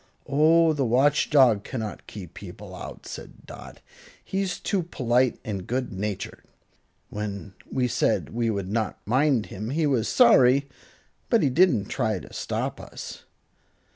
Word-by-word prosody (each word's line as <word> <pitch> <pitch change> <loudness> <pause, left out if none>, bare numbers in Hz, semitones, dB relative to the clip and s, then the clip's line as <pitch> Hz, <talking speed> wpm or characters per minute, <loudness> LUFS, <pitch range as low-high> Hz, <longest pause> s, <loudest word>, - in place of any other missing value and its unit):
"Oh, 160 +3 +4
the 145 -2 0
Watch 135 +5 +3
Dog 125 -8 +5
cannot 110 -4 -6
keep 95 -6 -9
people - - -10
out," - - -9
said - - -10
Dot. - - -11 0.4
"He's 190 -2 -2
too 195 -3 0
polite 125 -6 +1
and 100 -5 -4
good 125 -2 -2
natured. 100 +1 -4 0.7
When 100 -2 -5 0.2
we 125 -1 +1
said 120 - 0
we 115 0 0
would 100 -3 -3
not 110 -1 -1
mind 130 0 +2
him 105 +3 -5
he 155 +4 0
was 130 -7 +1
sorry, 130 +4 +5 0.6
but 230 -6 +3
he 140 - +2
didn't 140 - +4
try 110 0 -1
to 90 - -11
stop - - -3
us." - - -9
125 Hz, 145 wpm, -25 LUFS, 105-145 Hz, 0.7 s, Dog